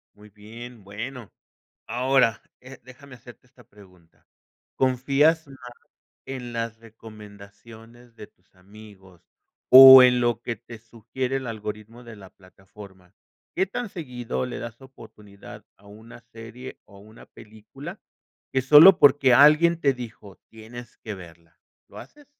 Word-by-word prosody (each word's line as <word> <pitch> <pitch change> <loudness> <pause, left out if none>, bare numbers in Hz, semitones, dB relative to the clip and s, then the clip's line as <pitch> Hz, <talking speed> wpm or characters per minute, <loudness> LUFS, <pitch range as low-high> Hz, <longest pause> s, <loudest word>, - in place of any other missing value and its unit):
Muy 105 +1 -19
bien, 110 +2 -14
bueno, 115 +4 -10 0.6
ahora, 125 0 0 0.2
eh, 130 0 -15
déjame 130 +1 -16
hacerte 120 +1 -18
esta 125 -1 -23
pregunta, 90 -5 -23 0.5
¿confías 140 +5 0
más 125 -3 -14 0.6
en 125 -3 -9
las 115 -1 -6
recomendaciones 110 +2 -17
de 105 - -14
tus 90 +1 -42
amigos 95 -2 -19 0.4
o 130 0 +10
en 125 -1 +2
lo 120 -2 -2
que 120 - -5
te 115 +1 -15
sugiere 120 +4 -7
el 130 -2 -7
algoritmo 110 +2 -9
de 120 -1 -13
la 95 -3 -16
plataforma? 95 -1 -18 0.4
¿Qué 190 - 0
tan 235 +5 -7
seguido 125 - -7
le 125 - -8
das 120 +1 -10
oportunidad 105 -6 -16
a 100 +1 -22
una 110 +4 -16
serie 115 +2 -13
o 100 -1 -19
una 110 +2 -18
película, 115 - -14 0.5
que 130 - 0
sólo 150 +8 +6
porque 140 -3 +4
alguien 155 +5 +4
te 140 -3 0
dijo: 115 -5 -13
"Tienes 115 +2 -14
que 110 - -9
verla", 85 -3 -17 0.3
lo - - -15
haces? 295 -1 -16
115 Hz, 135 wpm, -22 LUFS, 105-130 Hz, 0.6 s, o